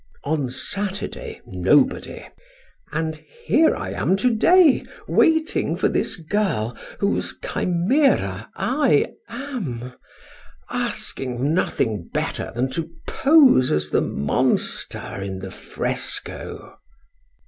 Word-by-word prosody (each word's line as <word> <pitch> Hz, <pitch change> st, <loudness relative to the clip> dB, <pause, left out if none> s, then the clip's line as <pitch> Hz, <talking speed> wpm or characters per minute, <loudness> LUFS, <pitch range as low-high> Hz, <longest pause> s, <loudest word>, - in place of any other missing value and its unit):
On 145 Hz, -3 st, -1 dB
Saturday, 195 Hz, +9 st, -4 dB
nobody. -, -, +1 dB, 0.7 s
And 160 Hz, 0 st, -2 dB
here 325 Hz, -, +1 dB
I 95 Hz, -, -5 dB
am 135 Hz, -, +1 dB
to 245 Hz, +4 st, +2 dB
day 340 Hz, +4 st, +5 dB, 0.2 s
waiting 320 Hz, -1 st, +2 dB
for -, -, +2 dB
this -, -, 0 dB
girl 160 Hz, -, -1 dB, 0.2 s
whose -, -, -1 dB
chimera 175 Hz, -, +1 dB
I 260 Hz, -, +2 dB, 0.2 s
am, 200 Hz, -, -5 dB, 0.8 s
asking 130 Hz, +3 st, -2 dB
nothing 110 Hz, -, -1 dB
better -, -, -2 dB
than 130 Hz, +2 st, 0 dB
to 165 Hz, +3 st, -3 dB, 0.2 s
pose 275 Hz, -, +5 dB
as 75 Hz, 0 st, 0 dB
the -, -, +3 dB
monster 70 Hz, +6 st, -1 dB
in 95 Hz, -1 st, -4 dB
the 95 Hz, 0 st, -7 dB
fresco." -, -, -4 dB
160 Hz, 100 wpm, -22 LUFS, -, 0.8 s, day